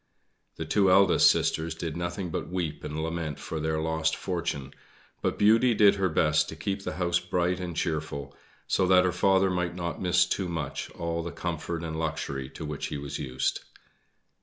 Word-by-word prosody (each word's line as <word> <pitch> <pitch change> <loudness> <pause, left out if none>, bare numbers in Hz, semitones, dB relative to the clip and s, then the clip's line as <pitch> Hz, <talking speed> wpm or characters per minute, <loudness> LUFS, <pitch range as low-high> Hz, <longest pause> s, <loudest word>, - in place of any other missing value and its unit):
The - - -5
two 100 -2 +3
eldest 95 0 +6
sisters 80 0 0
did 80 -2 -4
nothing 85 +1 -3
but - - -3
weep 85 -4 -3
and 75 +1 -3
lament 80 -2 -3
for 80 - -5
their 80 0 -1
lost 80 0 0
fortune, 80 -7 -3 0.5
but - - -1
Beauty 115 +3 +5
did 105 -1 +6
her 95 -2 0
best 75 -1 +2
to - - -7
keep 100 +4 -3
the - - -3
house 90 -1 +1
bright 90 +1 0
and 85 -3 -5
cheerful, 75 -4 -3 0.3
so 95 - +1
that 90 0 +6
her 90 - +2
father 95 +1 +3
might 90 -1 -1
not 85 -1 -4
miss 90 -1 +4
too 95 - -2
much 80 -3 -4
all 85 0 -2
the 85 0 -5
comfort 85 -1 -4
and 80 -1 -4
luxury 70 -4 -3
to 75 - -8
which 75 -1 -4
he - - -4
was 70 -1 -5
used. 65 -3 -1
85 Hz, 185 wpm, -28 LUFS, 80-90 Hz, 0.5 s, eldest